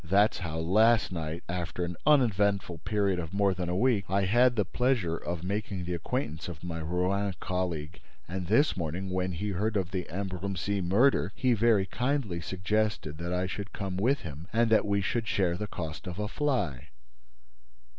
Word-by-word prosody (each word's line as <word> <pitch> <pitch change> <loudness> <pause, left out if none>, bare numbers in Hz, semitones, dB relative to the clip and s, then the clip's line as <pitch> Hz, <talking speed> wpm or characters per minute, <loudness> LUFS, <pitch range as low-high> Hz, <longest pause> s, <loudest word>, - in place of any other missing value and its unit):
That 100 +5 +4
is - - -5
how, 80 -3 -4
last 110 +8 +4
night, 80 -1 -4
after 90 0 -2
an 85 0 -5
uneventful 100 - +3
period 100 0 0
of 85 +2 -5
more 100 -1 +3
than 90 -1 -3
a 90 - 0
week, 110 -1 +2
I 100 +1 +2
had 120 +5 +4
the 105 -3 +1
pleasure 120 -7 +1
of 85 0 -4
making 100 -1 -3
the 90 - -2
acquaintance 85 - -3
of 85 -2 -8
my 85 -2 -4
Rouen 90 +4 0
colleague; 85 -5 -3 0.3
and, 90 0 -4
this 130 - +4
morning, 90 +2 -3
when 90 0 -1
he 100 +5 -3
heard 105 +3 0
of 95 -2 -2
the 90 -2 -3
Ambrumésy 95 +2 -2
murder, 100 +1 +3
he 130 -2 +2
very 110 -3 +3
kindly 120 -7 -1
suggested 95 -2 -1
that 85 +1 -3
I 90 +1 0
should 100 +1 -5
come 95 -2 -4
with 125 +9 +2
him 80 +2 -8
and 115 0 +2
that 110 - +4
we 100 0 +2
should 115 +4 -1
share 90 -5 +1
the 105 +3 -4
cost 80 -2 -6
of 90 0 -5
a 105 0 -2
fly." 105 - -1
95 Hz, 185 wpm, -29 LUFS, 85-105 Hz, 0.3 s, That